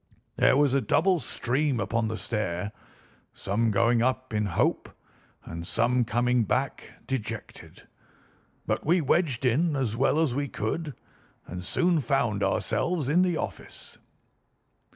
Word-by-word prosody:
There 130 - +4
was 145 -2 +3
a 140 - +3
double 175 - +2
stream 135 0 -1
upon 110 +3 0
the 110 0 -3
stair, 100 -3 -2 0.6
some 110 +4 0
going 115 +3 +3
up 130 0 -1
in 105 -1 0
hope, 90 - 0 0.6
and 85 +1 -7
some 125 0 +2
coming 120 +1 +2
back 130 +5 -2 0.2
dejected; 115 -4 -6 0.8
but - - -1
we 175 +4 +3
wedged 145 -4 +1
in 150 +6 +2
as 125 -5 -1
well 135 +5 +2
as 160 -6 +1
we 140 +2 -1
could 140 +6 -3 0.5
and 90 +1 -7
soon 175 - +1
found 120 -6 0
ourselves 140 - 0
in 170 +5 +4
the 180 -3 +1
office." 105 - -7
125 Hz, 135 wpm, -27 LUFS, 110-145 Hz, 0.8 s, There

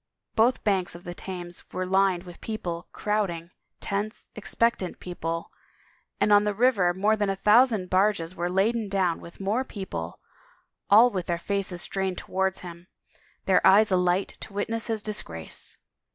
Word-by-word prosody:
Both 235 +3 +3
banks 190 -4 +1
of 175 - -11
the 175 - -6
Thames 175 -1 -7
were 185 - -2
lined 190 -1 +2
with 175 -2 -12
people, 175 -6 -4
crowding, 185 -5 -2 0.3
tense, 205 +2 -4
expectant 215 -3 0
people, 165 -2 -4 0.7
and 205 +1 +4
on 205 0 +6
the 210 -1 -1
river 215 -6 +3
more 205 +4 +2
than 205 -2 0
a 195 - 0
thousand 210 -1 +4
barges 185 -3 +2
were 175 +1 -2
laden 210 +4 +1
down 185 -4 0
with 170 - -12
more 205 +6 0
people, 140 - -6 0.7
all 230 +5 +7
with 185 -4 -3
their 170 - 0
faces 185 0 -2
strained 190 -2 -2
towards 190 0 -1
him, 175 0 -10 0.6
their 190 - +4
eyes 205 +2 +6
alight 180 +1 +2
to 210 - -9
witness 225 +3 -2
his 220 -2 -2
disgrace. 85 - -5
195 Hz, 155 wpm, -26 LUFS, 175-210 Hz, 0.7 s, all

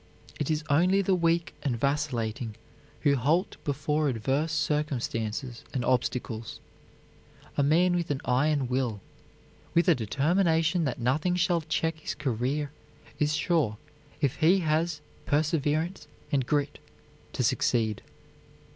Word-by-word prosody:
It 150 - -1
is 155 0 0
only 180 +7 +3
the 195 - +2
weak 170 -1 +1
and 125 -5 -1
vacillating 120 -6 -1 0.5
who 145 -2 +4
halt 155 - +1
before 150 +1 0
adverse 135 +6 0
circumstances 130 -6 -2
and 125 -2 0
obstacles. 120 -3 -1 1.0
A - - +2
man 170 +5 +4
with 175 -1 -1
an 140 -2 -1
iron 135 +2 +2
will, 125 -4 -1 0.8
with 170 +3 +4
a 175 - +7
determination 160 - +1
that 130 - -2
nothing 150 +9 +1
shall 175 -1 +2
check 160 0 -1
his 145 -1 -4
career, 140 +1 -1 0.5
is 150 0 +2
sure, 150 -12 +1 0.4
if 140 -1 +1
he 175 +4 +4
has 160 0 0 0.3
perseverance 155 +3 0 0.2
and 135 -3 +1
grit, 145 -1 0 0.5
to - - -1
succeed. 110 -3 +1
150 Hz, 125 wpm, -28 LUFS, 130-165 Hz, 1.0 s, a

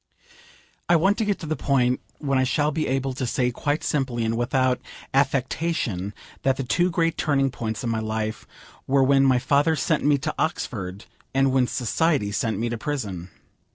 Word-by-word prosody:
I 175 - +6
want 190 +7 +3
to 220 - +1
get 205 -1 0
to - - -5
the 155 0 -1
point 130 -3 +1 0.2
when 135 -3 0
I - - +3
shall 145 +3 +1
be 155 +1 -1
able 135 0 -1
to 130 -1 -3
say 125 +1 +1
quite 145 +5 -1
simply, 130 -6 -1
and 110 +1 0
without 125 +1 +1 0.3
affectation 135 - 0 0.3
that 130 -1 +1
the 135 - -2
two 175 +8 +2
great 165 -1 0
turning 135 -3 +2
points 110 -1 -4
in 120 - -1
my 110 - 0
life 110 0 -3 0.4
were 135 0 +4
when 135 +1 +4
my 130 -2 +4
father 140 +5 +2
sent 155 -1 0
me 145 0 +4
to 155 +3 -3
Oxford, 100 - -3 0.3
and 135 0 +3
when 130 -1 +3
society 130 -2 0
sent 110 0 -1
me 115 +3 -1
to 115 -1 -4
prison. 105 - -4
135 Hz, 190 wpm, -24 LUFS, 120-145 Hz, 0.4 s, I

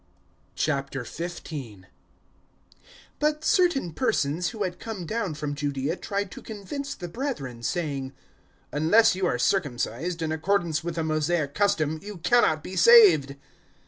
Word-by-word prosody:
015:001 140 - -4 1.3
But 300 +1 0
certain 345 - +2
persons 175 - 0
who 220 -3 -4
had 180 -2 -4
come 215 -6 -6
down 200 -4 -2
from 150 -1 -3
Judaea 145 +1 -2
tried 200 -1 -3
to - - -9
convince 275 +7 -6
the 175 - -7
brethren, 165 - -5
saying, 140 -3 -2 0.6
"Unless 165 +10 +4
you 185 0 0
are 125 - 0
circumcised 145 - -1
in 160 - -1
accordance 170 0 0
with 170 -1 -4
the 165 - -1
Mosaic 155 -1 0
custom, 160 -6 +1
you 205 -1 -8
cannot 170 -3 +3
be 190 - -7
saved." 415 - +7
170 Hz, 130 wpm, -26 LUFS, 145-205 Hz, 1.3 s, saved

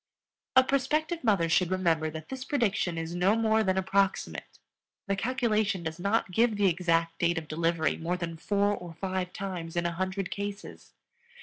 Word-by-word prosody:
A 260 - +8
prospective 305 +6 0
mother 200 -8 +3
should 170 +2 +2
remember 165 -4 +1
that 155 0 -8
this 265 -1 -5
prediction 220 - 0
is 165 +1 -4
no 180 +4 +3
more 220 -1 +2
than 190 -2 +1
approximate. 195 +1 0 0.5
The 195 - 0
calculation 215 -4 0
does 160 +1 -5
not 200 +1 0
give 225 +3 +3
the 205 - +2
exact 165 -2 +1
date 170 0 +2
of 160 -1 -4
delivery 165 +1 0
more 175 +2 -2
than 170 -2 -4
four 205 +4 +1
or 175 -3 -9
five 185 0 -3
times 180 -5 -5
in 175 0 0
a 170 - +1
hundred 185 +2 -3
cases. 200 0 -6
185 Hz, 175 wpm, -29 LUFS, 170-210 Hz, 0.5 s, A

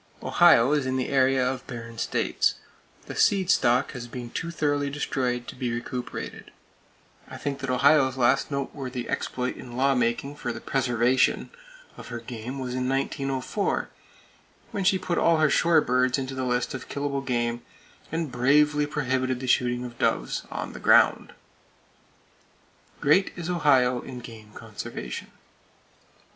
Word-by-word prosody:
Ohio 120 +4 +5
is 145 -3 +1
in 130 0 0
the 130 - -2
area 130 -1 +3
of 130 0 -4
barren 115 -2 -8
states. - - 0 0.5
The - - -7
seed 195 -2 +3
stock 125 -3 +3
has 125 -3 -7
been 120 -1 -7
too 170 - -4
thoroughly 145 -3 0
destroyed 125 -4 -2
to - - -8
be 125 -2 -2
recuperated. 120 +1 -5 0.8
I - - -9
think 140 -1 -4
that 135 -1 -4
Ohio's 135 0 +4
last 130 +2 +2
noteworthy 135 -3 -4
exploit 125 0 -3
in 120 -1 -9
lawmaking 135 +1 +1
for - - -3
the - - -6
preservation 125 -1 +1 0.2
(!) - - -22
of - - -10
her 120 -1 -5
game 120 +2 -7
was 130 -2 -4
in 130 0 -1
1904, 135 +6 -1 0.8
when 200 - -2
she 190 +1 +4
put 180 -2 -1
all 165 -1 +4
her 155 -2 +3
shore 170 -2 +4
birds 125 0 +2
into 135 -1 -4
the 130 -1 -3
list 125 0 -1
of 130 -1 -7
killable 140 -1 -2
game, 120 -2 -1 0.5
and 160 -3 -2
bravely 150 +4 +3
prohibited 130 -3 -1
the 130 - -5
shooting 125 0 +1
of 120 -1 -10
doves - - 0
on - - -5
the - - -8
ground! - - +4 1.7
Great 170 +7 +3
is 175 0 -4
Ohio 130 -7 +3
in 130 - -8
game 110 -3 -11
conservation! - - -7
130 Hz, 155 wpm, -26 LUFS, 125-145 Hz, 1.7 s, Ohio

